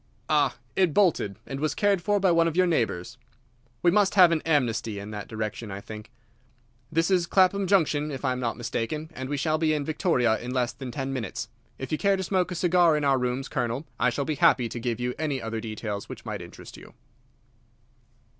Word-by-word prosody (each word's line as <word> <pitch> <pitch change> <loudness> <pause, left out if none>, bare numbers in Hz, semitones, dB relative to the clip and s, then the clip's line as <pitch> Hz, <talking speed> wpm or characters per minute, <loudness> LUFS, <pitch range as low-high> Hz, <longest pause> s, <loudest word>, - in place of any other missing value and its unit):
"Ah, - - +2 0.2
it 185 -6 +2
bolted, 165 - +2
and 135 - -5
was 155 0 -1
cared 205 -4 +2
for 205 +3 +1
by 190 -2 +3
one 165 0 +4
of 165 - -2
your 185 - +5
neighbours. 115 - -1 0.6
We 175 - +5
must 200 +1 +3
have 180 -3 +7
an 160 -2 +1
amnesty 120 -8 +1
in 100 +1 -7
that 105 -1 -6
direction, 110 0 -5
I 95 0 -5
think. 105 +1 -10 0.8
This 165 +4 +1
is 180 -2 +2
Clapham 190 +1 +3
Junction, 155 -6 +2
if 140 -1 -5
I 130 - +2
am 125 - -2
not 120 -2 -2
mistaken, 120 +7 -3
and 130 -3 -6
we 145 - -1
shall 155 +2 0
be 155 -1 +2
in 145 -2 -2
Victoria 135 - +1
in 125 +2 -5
less 120 -2 0
than 130 +1 -7
ten 135 +2 -4
minutes. 115 -4 -4 0.3
If 130 - -6
you 155 - 0
care 200 -1 +3
to 190 - -3
smoke 185 0 0
a - - -3
cigar 175 -2 +4
in 150 - -2
our 135 -2 +3
rooms, 125 +2 -2
Colonel, 125 +1 -2
I 125 - +3
shall 135 +4 -2
be 155 - -1
happy 125 -2 +4
to 120 - -5
give 120 -1 -2
you 125 0 -1
any 150 -4 -1
other 115 -1 -4
details 110 -2 -5
which - - -9
might - - -4
interest - - -11
you." - - -14
140 Hz, 220 wpm, -26 LUFS, 120-170 Hz, 0.8 s, have